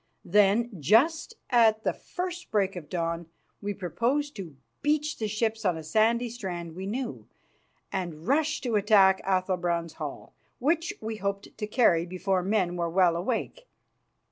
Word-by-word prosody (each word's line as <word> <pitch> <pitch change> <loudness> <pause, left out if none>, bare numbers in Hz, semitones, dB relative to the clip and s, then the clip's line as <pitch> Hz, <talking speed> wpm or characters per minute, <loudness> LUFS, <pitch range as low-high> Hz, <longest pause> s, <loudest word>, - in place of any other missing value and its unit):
Then, 210 +5 +3
just 315 - +3 0.2
at 220 -3 +4
the - - +1
first 360 -1 -6
break 195 -2 +1
of 160 -5 -8
dawn, 170 -1 -2 0.3
we 205 0 -3
proposed 245 - -1
to 165 -8 -8 0.2
beach 300 +1 0
the 220 - -1
ships 220 +1 -1
on 180 -4 +1
a 160 - -7
sandy 225 +8 +2
strand 180 -8 -6
we 190 +2 -5
knew, 245 +4 -4 0.6
and 170 -4 -4
rush 300 +3 +1
to 240 -4 -1
attack 195 -2 +5
Athalbrand's 180 -3 0
hall, 150 -3 -7 0.2
which 330 +6 +1
we 220 0 -4
hoped 200 -1 -4
to 210 -1 -4
carry 185 -7 +3
before 185 +1 0
men 185 -2 0
were 170 -1 -1
well 175 -1 +3
awake. 250 - -3
205 Hz, 150 wpm, -28 LUFS, 175-235 Hz, 0.6 s, attack